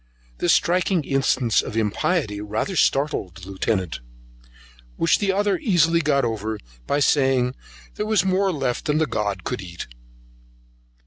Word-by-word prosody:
This -, -, +2 dB
striking 180 Hz, -1 st, +2 dB
instance 135 Hz, -4 st, +1 dB
of 110 Hz, -, -6 dB
impiety 110 Hz, -, 0 dB
rather 110 Hz, -, -3 dB
startled 140 Hz, -, +1 dB
the 95 Hz, 0 st, -11 dB
Lieutenant, 95 Hz, -3 st, -1 dB, 1.0 s
which 165 Hz, -, +2 dB
the 200 Hz, -2 st, +1 dB
other 205 Hz, +4 st, +1 dB
easily 170 Hz, -, +3 dB
got 140 Hz, -4 st, +2 dB
over, 110 Hz, -1 st, -3 dB, 0.3 s
by 145 Hz, -, +1 dB
saying 130 Hz, -3 st, +2 dB, 0.4 s
there 210 Hz, -, -3 dB
was 215 Hz, -4 st, +2 dB
more 190 Hz, +1 st, +2 dB
left 135 Hz, -6 st, -2 dB
than 150 Hz, -1 st, +1 dB
the 160 Hz, -, +2 dB
god 100 Hz, -7 st, -2 dB
could 125 Hz, -, -3 dB
eat. 85 Hz, -2 st, -7 dB
135 Hz, 140 wpm, -23 LUFS, 110-175 Hz, 1.0 s, easily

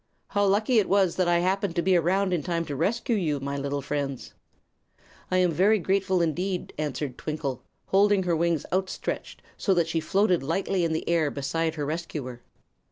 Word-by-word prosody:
How 205 Hz, -, +1 dB
lucky 215 Hz, +4 st, +3 dB
it 205 Hz, -, 0 dB
was 195 Hz, -3 st, +3 dB
that 185 Hz, -2 st, +2 dB
I 175 Hz, 0 st, +4 dB
happened 190 Hz, 0 st, 0 dB
to 170 Hz, -, +1 dB
be 190 Hz, +1 st, +3 dB
around 185 Hz, +3 st, +2 dB
in 170 Hz, -, +1 dB
time 170 Hz, +2 st, -2 dB
to 145 Hz, -, -5 dB
rescue 230 Hz, -, 0 dB
you, 155 Hz, -8 st, 0 dB
my 140 Hz, +1 st, -4 dB
little 140 Hz, 0 st, -3 dB
friends." 140 Hz, -2 st, -4 dB, 1.0 s
"I 185 Hz, -, +1 dB
am 180 Hz, -2 st, +3 dB
very 195 Hz, +7 st, +4 dB
grateful, 190 Hz, -1 st, +1 dB
indeed," 180 Hz, +3 st, -2 dB
answered 145 Hz, -3 st, -3 dB
Twinkle, 145 Hz, -5 st, -3 dB, 0.2 s
holding 200 Hz, 0 st, +3 dB
her 175 Hz, -2 st, +1 dB
wings 165 Hz, -2 st, 0 dB
outstretched 190 Hz, 0 st, -3 dB
so 195 Hz, -, +1 dB
that 170 Hz, -2 st, +2 dB
she 165 Hz, 0 st, 0 dB
floated 190 Hz, +1 st, +2 dB
lightly 180 Hz, +5 st, -1 dB
in 165 Hz, -1 st, 0 dB
the 160 Hz, -, -3 dB
air 165 Hz, -3 st, +2 dB
beside 160 Hz, +4 st, -2 dB
her 150 Hz, -2 st, -3 dB
rescuer. 150 Hz, -6 st, -5 dB
170 Hz, 185 wpm, -26 LUFS, 150-190 Hz, 1.0 s, I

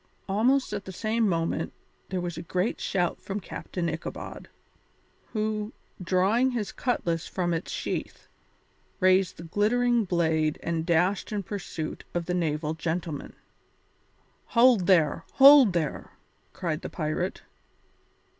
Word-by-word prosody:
Almost 235 Hz, +5 st, +2 dB
at 200 Hz, -2 st, -4 dB
the 190 Hz, -, -6 dB
same 220 Hz, +3 st, 0 dB
moment 165 Hz, -2 st, -1 dB, 0.4 s
there 185 Hz, -, -2 dB
was 175 Hz, -1 st, -4 dB
a 165 Hz, -, -5 dB
great 180 Hz, +5 st, -1 dB
shout 180 Hz, -3 st, -1 dB
from 195 Hz, +1 st, -4 dB
Captain 180 Hz, -2 st, -5 dB
Ichabod, 160 Hz, 0 st, -6 dB, 0.8 s
who, 215 Hz, 0 st, -2 dB, 0.3 s
drawing 195 Hz, +8 st, +2 dB
his 235 Hz, -5 st, -3 dB
cutlass 170 Hz, -9 st, -1 dB
from 175 Hz, -2 st, -1 dB
its 165 Hz, +1 st, -3 dB
sheath, -, -, -4 dB, 0.7 s
raised 185 Hz, -1 st, +3 dB
the 165 Hz, -, -9 dB
glittering 230 Hz, +6 st, +2 dB
blade 160 Hz, -4 st, +1 dB
and 165 Hz, 0 st, -2 dB
dashed 180 Hz, +6 st, +1 dB
in 205 Hz, -2 st, -2 dB
pursuit 175 Hz, -5 st, -5 dB
of 170 Hz, -1 st, -1 dB
the 180 Hz, -, -2 dB
naval 155 Hz, -3 st, -1 dB
gentleman. 160 Hz, -2 st, -4 dB, 1.2 s
"Hold 235 Hz, -7 st, +6 dB
there! 165 Hz, -6 st, +3 dB
Hold 275 Hz, -6 st, +8 dB
there!" 160 Hz, -4 st, -2 dB, 0.4 s
cried 165 Hz, -3 st, -3 dB
the -, -, -5 dB
pirate. 160 Hz, +3 st, -3 dB
180 Hz, 125 wpm, -27 LUFS, 165-210 Hz, 1.2 s, Hold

